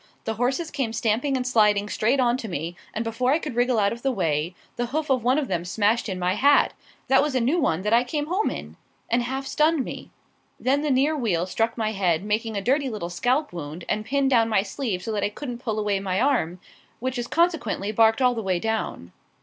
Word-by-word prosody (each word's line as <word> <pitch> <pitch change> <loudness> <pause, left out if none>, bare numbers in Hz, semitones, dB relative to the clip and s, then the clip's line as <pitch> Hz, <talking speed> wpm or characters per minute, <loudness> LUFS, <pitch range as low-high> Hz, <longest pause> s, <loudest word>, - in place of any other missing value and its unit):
The 225 - -2
horses 260 +8 -1
came 265 -6 -2
stamping 230 +5 0
and 250 - -3
sliding 210 -4 +3
straight 235 +6 +1
on 240 -1 +3
to 235 - -6
me, 170 -2 -4 0.2
and, 225 - -3
before 250 +4 +1
I - - +4
could 305 -5 -5
wriggle 245 0 +2
out 200 0 +2
of 235 - -9
the 270 - +1
way, 165 - -1 0.2
the 240 0 -2
hoof 300 +3 -2
of 255 -3 +2
one 255 +3 +3
of 295 -3 0
them 170 - -1
smashed 210 +5 +1
in 185 - -3
my 180 0 0
hat 280 +7 +4 0.3
that 265 +1 +5
was 290 -2 -1
a - - +3
new 265 +9 +2
one 185 - 0
that 210 +2 +1
I 235 +1 +5
came 290 +4 -2
home 370 +7 0
in - - -7 0.3
and 240 +1 +3
half 265 +3 -3
stunned 305 0 +2
me. - - -7 0.5
Then 275 +3 +1
the 300 - -1
near 280 +4 +2
wheel 200 - 0
struck 225 +5 -1
my 220 -1 0
head, 185 -4 +1
making 215 +1 -1
a - - -1
dirty 270 +5 +1
little 205 -7 -5
scalp 255 - 0
wound, 165 0 -7
and 215 - -1
pinned 275 +3 +1
down 230 -3 +4
my 210 -3 +2
sleeve 200 -3 -3
so 225 - -3
that 205 -2 -1
I - - +1
couldn't 245 +2 -6
pull 225 -4 -3
away 205 -2 0
my 190 -1 -1
arm, 230 - +1 0.4
which 255 +1 -2
is 240 - -3
consequently 325 - 0
barked 225 +3 +4
all 250 -1 +4
the 230 - -3
way 185 -4 0
down. 220 - -3
230 Hz, 240 wpm, -24 LUFS, 205-265 Hz, 0.5 s, that